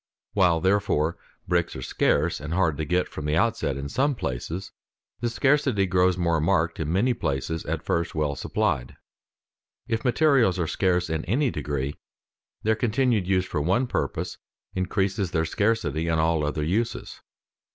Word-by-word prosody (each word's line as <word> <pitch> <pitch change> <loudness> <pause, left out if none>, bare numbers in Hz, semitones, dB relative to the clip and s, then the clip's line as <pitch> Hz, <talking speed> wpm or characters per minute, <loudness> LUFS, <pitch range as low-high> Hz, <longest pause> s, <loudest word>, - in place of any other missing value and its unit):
While, 90 -5 +3
therefore, 95 -5 +1 0.3
bricks 85 -1 0
are 65 - -6
scarce - - +1
and 75 +4 -4
hard 85 -5 +2
to 80 - -2
get 90 +4 +1
from 75 - -7
the 75 0 +1
outset 110 - +1
in 70 +1 -4
some 135 - +1
places, 80 - -4 0.5
the 120 - 0
scarcity 130 -4 +2
grows 90 -1 +2
more 85 -3 +1
marked 85 -1 +1
in 80 -1 -2
many 110 +8 +2
places 80 - -2
at - - -2
first 85 0 -1
well 75 -2 0
supplied. 60 -2 -1 0.9
If 115 -1 -1
materials 125 - +3
are 85 - 0
scarce 90 +2 +1
in 80 -1 -2
any 125 - +1
degree, 70 -2 -3 0.6
their 110 - +3
continued 115 -3 +1
use 95 -1 +2
for 75 -5 -2
one 95 - +2
purpose - - -3 0.3
increases 95 +1 0
their 80 -1 0
scarcity 85 -6 0
in 80 -1 +1
all 80 -1 +2
other 75 +1 -1
uses. 105 +9 -2
90 Hz, 160 wpm, -25 LUFS, 80-110 Hz, 0.9 s, While